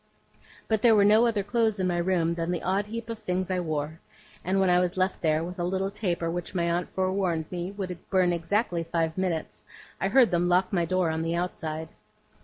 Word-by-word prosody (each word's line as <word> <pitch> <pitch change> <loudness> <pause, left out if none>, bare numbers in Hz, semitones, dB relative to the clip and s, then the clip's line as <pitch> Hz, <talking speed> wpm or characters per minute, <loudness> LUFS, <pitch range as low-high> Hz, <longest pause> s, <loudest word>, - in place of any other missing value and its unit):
But 220 -2 +1
there 230 -2 +6
were 200 -1 +5
no 215 +3 +5
other 215 -4 0
clothes 220 0 +1
in 185 - +1
my 175 -1 0
room 170 -2 +1
than 170 0 -3
the 175 -2 -2
odd 195 +3 0
heap 230 +1 -6
of 230 -1 -5
things 185 -2 -2
I 185 - 0
wore; 155 -1 -3 0.4
and 190 +2 +1
when 190 - +3
I 180 0 +4
was 180 0 -1
left 185 +1 0
there, 155 0 +2
with 180 +2 -7
a - - 0
little 190 +2 -1
taper 175 -5 -2
which 175 +2 -5
my 170 -1 +1
aunt 175 +1 -1
forewarned 185 -4 0
me 175 0 -3
would 190 -3 -4
burn 185 -2 +3
exactly 175 +1 0
five 165 -1 -1
minutes, 180 -4 -3 0.4
I - - +1
heard 255 -5 +5
them 175 0 +1
lock 185 +2 +2
my 175 -3 +2
door 180 -1 +1
on 160 0 -2
the 165 +1 -1
outside. 160 -2 -3
180 Hz, 220 wpm, -27 LUFS, 170-195 Hz, 0.4 s, there